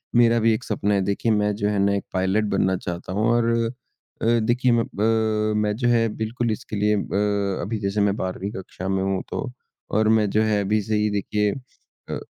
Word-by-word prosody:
मेरा 120 -1 +5
भी 115 0 +3
एक 125 - -3
सपना 105 -1 -1
है, 100 - +2
देखिए 100 +4 0
मैं 105 -1 +2
जो 105 0 -1
है 105 -1 0
ना 100 0 +3
एक 100 - -2
पायलट 95 +3 +1
बनना 95 0 +1
चाहता 90 +1 -5
हूँ 105 +3 +1
और 120 -1 +2 0.8
अ, - - -1
देखिए 120 +3 +2
मैं 115 -1 +2
प 100 - -3
अ, 110 -1 +1
मैं 105 -1 0
जो 120 +2 0
है 115 -1 +3
बिल्कुल 115 +1 -2
इसके 110 - -5
लिए 105 +1 +2
अ, 100 -1 -1
अभी 110 +1 -3
जैसे 100 +1 -1
मैं 100 0 +2
12वीं 95 +2 -3
कक्षा 95 -2 -7
में 95 0 0
हूँ 95 -1 0
तो 130 -3 -4 0.5
और 110 0 +3
मैं 110 -2 +3
जो 105 - +2
है 105 -1 +1
अभी 105 +2 +1
से 110 +2 -2
ही 105 0 +2
देखिए 105 0 0
अ 130 +2 -12
अ, - - -3
105 Hz, 225 wpm, -23 LUFS, 100-110 Hz, 0.8 s, मेरा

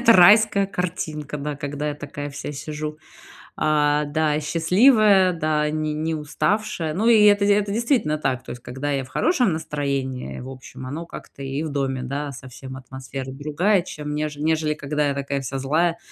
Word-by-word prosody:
какая-то 230 -1 +7
райская 200 +2 +6
картинка. 155 -6 -4
Да, 145 0 -4
когда 145 +1 -3
я - - -4
такая 145 0 -6
вся 140 +1 -6
сижу, 150 +1 -5 0.6
а, 150 -1 +3
да, 150 0 +1
и - - -1
счастливая, 190 - +4
да, 155 -2 0
ни 155 0 -1
не 155 +2 -1
уставшая. 165 +2 -1
Ну 210 +7 0
и 220 -3 +6
это, 205 -1 +5
это 200 0 +3
действительно 230 - +1
так. 130 -4 -1
То - - -7
есть 120 0 -8
когда 135 +4 -4
я 135 -1 0
в 130 - -13
хорошем 255 - +2
настроении, 140 - -3
в 130 - -8
общем, 130 0 -10
оно 155 +5 -5
как-то 140 -4 -10
и 135 +2 -3
в 160 - -3
доме, 135 -2 -1
да, 140 +3 -3
совсем 130 0 -9
атмосфера 130 +1 -7
другая, 155 +8 +1
чем 150 -4 -6
неж 150 -1 -3
нежели 155 0 +1
когда 150 0 -1
я - - 0
такая 140 0 -2
вся 135 +1 -4
злая, 165 +5 +1
150 Hz, 180 wpm, -23 LUFS, 140-170 Hz, 0.6 s, какая-то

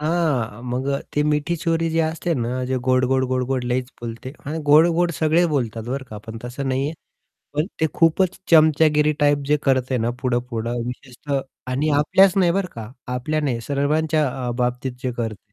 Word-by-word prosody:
हां, 150 -9 0
मग 125 +2 -2 0.3
ते 150 - +2
मिठी 150 +2 0
छुरी 165 0 0
जी 165 - 0
असते 160 +2 -2
ना, 120 -4 -1 0.2
जे 130 +1 -1
गोड, 130 0 +3
गोड, 130 0 +2
गोड, 130 0 0
गोड 130 -1 -1
लईच 125 +1 -1
बोलते 120 +2 -6
आणि 155 +3 -3
गोड, 155 +3 +7
गोड 175 +1 +2
सगळे 160 +2 +3
बोलतात 120 -8 -2
बरं 135 +1 -3
का, 105 - -7
पण 110 +2 -9
तसं 130 +3 -4
नाहीये. 135 +3 0 0.6
पण 150 +3 +1
ते 160 - +4
खूपच 175 +2 +2
चमचागिरी 155 -1 +5
टाइप 145 0 +4
जे 150 +1 +3
करते 130 -1 +1
ना, 115 +1 0
पुढं, 125 -2 +1
पुढं. 120 +1 -2
विशेषतः 125 +3 -4 0.3
आणि 140 +4 0
आपल्याच 185 +6 +5
नाही 180 -3 +4
बरं 195 0 -1
का, 115 -1 -7 0.2
आपल्या 155 +5 -1
नाही, 130 -6 -1
सर्वांच्या 150 +4 +1 0.2
अ, - - -1
बाबतीत 125 +1 -1
जे 130 - -1
करते. 110 -3 -5
140 Hz, 185 wpm, -22 LUFS, 125-155 Hz, 0.6 s, गोड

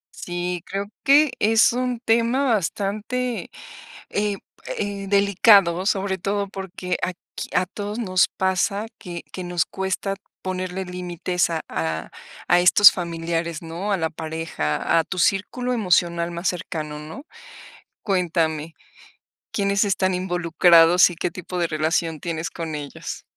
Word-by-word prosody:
Sí, 175 0 -4
creo 195 +1 -3 0.2
que 290 +1 +5
es 220 +2 +4
un 250 -1 -1
tema 235 +3 +2
bastante, 215 +3 -1 0.6
eh 205 -1 -1 0.4
eh, 200 -1 -3
delicado, 200 -2 +5
sobre 195 -1 0
todo 200 +2 -1
porque, 185 -2 -4
aquí, 180 -1 -5
a 180 - +3
todos 205 +4 -6
nos 185 -5 +2
pasa 190 +3 0
que 175 -4 -7
que 185 - -5
nos 175 -2 0
cuesta 190 +1 -3 0.3
ponerle 185 0 -3
límites 180 0 -2
a 160 -1 -2
a 80 +1 -3 0.4
a 175 - +5
estos 195 +3 +8
familiares, 165 -2 -3
¿no? 170 +6 -4
A 195 - +2
la 160 -2 -1
pareja, 160 - -1
a - - +1
tu 185 - -5
círculo 245 +8 +1
emocional 175 -5 +1
más 170 +2 -3
cercano, 155 -4 -5
¿no? 160 - -9 0.8
Cuéntame, 165 -5 0 0.8
¿Quiénes 200 0 +1
están 190 -2 +1
involucrados 175 -1 +5
y 175 - -8
qué 175 - -1
tipo 180 +1 -6
de 170 - +2
relación 160 0 0
tienes 165 -1 -3
con 165 -2 -5
ellos? 145 -1 -7
180 Hz, 135 wpm, -23 LUFS, 170-200 Hz, 0.8 s, estos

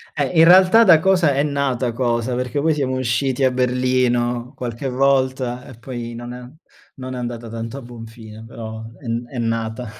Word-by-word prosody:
Eh, 140 -3 0
in - - +8
realtà 185 +5 +7
da 170 -7 +7
cosa 180 -4 +3
è 135 - +1
nata 140 -4 -1
cosa, 120 0 -1
perché 125 +2 -2
poi 160 +1 +2
siamo 130 -3 -1
usciti 130 +2 0
a 130 - +5
Berlino, 125 -1 0
qualche 120 +2 -5
volta, 130 -1 0
e 130 - -11
poi 120 -1 -6
non 120 +1 -7
è 125 0 -9 0.5
non 130 -1 -6
è - - -5
andata 120 -1 -5
tanto 115 +3 -6
a 140 - -7
buon 120 -2 -10
fine, 110 -1 -12
però 110 -1 -8 0.2
è 125 - -10
n 115 +1 -2
è 125 0 -7
nata. 115 0 -3
125 Hz, 190 wpm, -20 LUFS, 120-135 Hz, 0.5 s, in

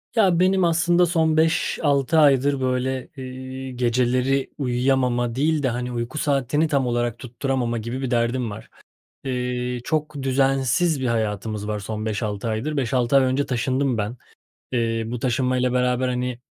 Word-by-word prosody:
Ya, 190 -6 +4
benim 185 +1 +3
aslında 170 +1 +3
son 160 -2 +1
5-6 160 -2 +2
aydır, 140 -2 +4
böyle, 130 0 -1
eee, 130 0 -7
geceleri 125 +2 +1
uyuyamama 125 -2 +1
değil 150 +2 +1
de, 130 - +2
hani, 125 +1 -3
uyku 120 +4 -4
saatini 145 +1 +1
tam 140 -4 +1
olarak 120 -1 -1
tutturamama 125 -1 -2
gibi 115 +4 -4
bir 130 -1 -3
derdim 120 0 0
var. 105 +2 -10 0.5
Eee, 125 -1 -2
çok 155 +1 -2
düzensiz 135 +3 +1
bir - - -1
hayatımız 110 -2 -2
var 105 -1 -2
son 110 +1 -5
5-6 105 0 -2
aydır. 120 +8 -2
5-6 125 0 +1
ay 135 - +6
önce 130 +2 +1
taşındım 130 +1 0
ben. 105 +4 -3 0.5
Eee, 115 -2 0
bu 120 +1 -4
taşınmayla 125 0 0
beraber, 125 0 +1
hani, 125 -1 -2
130 Hz, 150 wpm, -23 LUFS, 120-140 Hz, 0.5 s, ay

